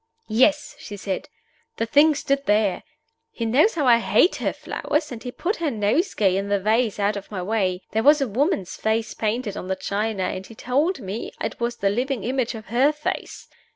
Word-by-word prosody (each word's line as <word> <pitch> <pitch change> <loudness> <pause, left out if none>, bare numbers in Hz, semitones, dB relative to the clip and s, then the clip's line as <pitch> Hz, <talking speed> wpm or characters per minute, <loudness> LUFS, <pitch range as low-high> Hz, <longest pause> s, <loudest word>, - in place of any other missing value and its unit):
"Yes!" 290 +6 +3
she 205 - -8
said. 200 +9 -4 0.5
"The 230 - 0
thing 295 +6 +5
stood 275 0 -1
there. 205 -2 +2 0.5
He 235 - -4
knows 280 - +3
how 300 -4 0
I 235 -2 +6
hate 340 +9 +3
her - - -1
flowers, 300 0 -3
and 235 -2 -7
he 250 - -6
put 370 - -2
her 330 -3 0
nosegay 210 - +1
in 200 +1 -2
the 200 0 +2
vase 220 +2 +1
out 205 +1 +1
of 200 -1 -7
my 190 -4 -4
way. 190 -3 -1
There 220 - +1
was 295 +4 +6
a 275 - 0
woman's 245 - 0
face 220 0 -1
painted 215 -1 -2
on 185 - -6
the 190 - -1
china, 205 0 -2
and 185 +1 -4
he 225 - -13
told 280 - 0
me 200 +3 -5
it - - -4
was 235 0 -1
the 195 -3 0
living 250 +1 -1
image 250 0 -1
of 220 -1 -8
her 265 +5 +4
face. 300 0 -5
230 Hz, 205 wpm, -23 LUFS, 205-275 Hz, 0.5 s, I